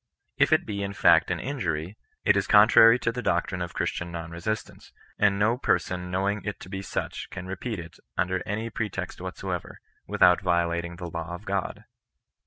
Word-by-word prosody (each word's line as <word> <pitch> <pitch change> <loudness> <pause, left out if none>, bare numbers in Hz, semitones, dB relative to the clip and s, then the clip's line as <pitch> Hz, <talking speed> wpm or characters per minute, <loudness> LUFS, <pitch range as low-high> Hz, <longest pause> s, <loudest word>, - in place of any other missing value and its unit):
If - - +4
it - - +4
be 100 -1 -4
in 100 0 -3
fact - - +5
an - - -1
injury, 80 +6 -3 0.3
it - - +5
is - - +1
con 105 +1 +7
trary 115 +1 +7
to 115 - +1
the 125 +1 -4
doctrine 90 -2 0
of 85 -2 -5
Christian 85 0 -2
non 85 -1 -6
resistance; 100 +6 -5 0.3
and 100 -1 +3
no 110 +4 +2
person 90 -8 0
knowing 100 +3 -1
it 105 - -4
to - - -10
be 95 0 -4
such 95 - -4
can 95 -2 -7
repeat 95 +4 -4
it 85 -1 -10 0.2
under 90 +1 0
any 110 +3 -3
pretext 105 -1 -4
whatsoever, - - -5 0.3
without 90 +1 +4
violating 85 -1 0
the 90 0 -7
law 85 0 -5
of 100 - -12
God. 100 -1 -3
95 Hz, 190 wpm, -26 LUFS, 85-105 Hz, 0.3 s, con